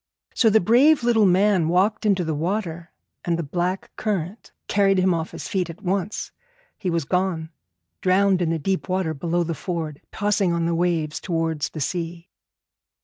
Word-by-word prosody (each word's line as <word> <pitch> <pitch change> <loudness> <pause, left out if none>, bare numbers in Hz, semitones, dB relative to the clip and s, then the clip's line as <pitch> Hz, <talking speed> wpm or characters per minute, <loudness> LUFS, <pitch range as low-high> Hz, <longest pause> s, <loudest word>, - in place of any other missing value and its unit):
So 225 - +4
the 220 +1 +5
brave 250 - +4
little 225 -4 +4
man 185 -2 +3
walked 185 +5 +2
down 210 -2 +3
into 185 -2 -1
the 160 -1 -2
water, 170 +1 -3 0.3
and 170 -1 0
the 170 - -2
black 180 +5 -2
current 200 -1 -3 0.2
carried 195 -1 +3
him 185 0 +3
off 165 -1 -2
his - - -7
feet 185 -3 -1
at 165 +5 -10
once. 195 +2 -2 0.5
He 190 - -2
was 165 -3 -1
gone, 180 -2 -1 0.5
drowned 190 0 +3
in 170 - +1
the 165 - 0
deep 185 +5 -2
water 185 -3 0
below 170 +4 -1
the 165 0 -2
ford, 160 -4 -4
tossing 205 -4 +1
on 170 -1 0
the 170 - 0
waves 165 -3 0
towards 165 -3 -1
the 155 - -7
sea. 170 +2 -4
180 Hz, 180 wpm, -23 LUFS, 165-195 Hz, 0.5 s, the